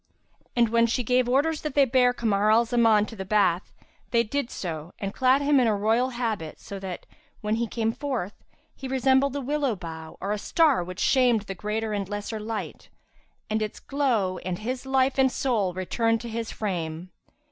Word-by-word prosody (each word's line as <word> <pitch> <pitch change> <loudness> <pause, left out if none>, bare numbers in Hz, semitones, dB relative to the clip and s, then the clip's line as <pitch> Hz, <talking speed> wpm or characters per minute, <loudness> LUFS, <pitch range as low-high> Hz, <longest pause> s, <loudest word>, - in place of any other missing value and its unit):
And 235 -2 +3
when 230 +1 +3
she 245 +2 0
gave 250 +1 +2
orders 300 +5 +2
that 305 -3 -4
they 280 -1 +6
bear 250 0 +4
Kamar 215 -4 +1
al 225 +2 +5
Zaman 225 -3 +4
to 225 - -10
the 190 - -5
bath, 190 -3 +1 0.4
they 235 -1 +3
did 250 +3 -2
so 165 -2 -6
and 195 -1 -4
clad 260 +2 +3
him 285 -1 +4
in 245 - +3
a 215 - +2
royal 225 +5 +2
habit 225 -10 -3
so 200 - -8
that, 190 -2 -6 0.4
when 215 +1 0
he 235 0 -1
came 225 0 -1
forth, 245 -8 -3 0.4
he 270 - -7
resembled 265 +1 +2
a 285 - -2
willow 280 -2 0
bough 160 -3 -8
or 195 - -3
a 210 - -1
star 300 - +3
which 185 +2 -8
shamed 250 -4 +3
the 200 -1 -6
greater 215 +3 -3
and 200 -2 -3
lesser 205 +1 -4
light[FN#335] 215 0 -5 0.6
and 215 0 +1
its 215 -1 -4
glow, 235 -10 0
and 180 -1 -4
his 255 +5 -4
life 265 0 +2
and 265 -1 +4
soul 225 -10 0
returned 225 +5 0
to 235 - -6
his 230 0 -4
frame. 175 -4 -4
225 Hz, 195 wpm, -26 LUFS, 200-255 Hz, 0.6 s, they